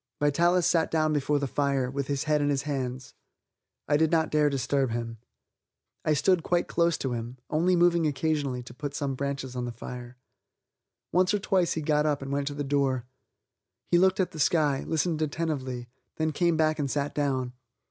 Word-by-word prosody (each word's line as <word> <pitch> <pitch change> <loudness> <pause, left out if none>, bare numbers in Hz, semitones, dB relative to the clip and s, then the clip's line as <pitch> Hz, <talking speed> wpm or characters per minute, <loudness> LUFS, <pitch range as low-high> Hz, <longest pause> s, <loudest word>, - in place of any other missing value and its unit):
Vitalis 170 +5 +3
sat 165 -2 +2
down 155 -1 +1
before 145 0 +1
the 140 - -1
fire, 140 -1 0
with 140 0 -3
his 140 -1 -1
head 150 -1 +1
in 145 - +1
his 140 -1 0
hands. 130 -3 -4 0.7
I 145 - +3
did 160 +1 +3
not 160 -1 +2
dare 150 -1 +3
disturb 135 0 0
him. 115 -1 -4 0.8
I 155 - +2
stood 180 +4 +3
quite 175 +1 0
close 170 -1 +1
to 130 -2 -2
him, 120 +2 -5
only 175 +4 +3
moving 170 -2 +3
occasionally 145 -3 -1
to 120 - -11
put 145 +2 -6
some 140 -2 -2
branches 140 -1 -4
on 125 -1 -2
the 120 - -4
fire. 120 +1 -8 0.9
Once 185 +4 +3
or - - 0
twice 185 -3 +1
he 160 - -3
got 150 0 +2
up 145 -2 0
and 135 - -6
went 140 0 -1
to 145 - -3
the 145 - -2
door. 135 -3 0 0.9
He 175 - +5
looked 190 +2 +3
at 185 -1 +1
the 160 - -9
sky, 150 -3 +2
listened 160 0 0
attentively, 140 -6 -2 0.3
then 155 0 0
came 170 +1 +1
back 155 0 +2
and 140 -2 -1
sat 145 +1 -1
down. 130 -4 -1
145 Hz, 195 wpm, -27 LUFS, 135-160 Hz, 0.9 s, He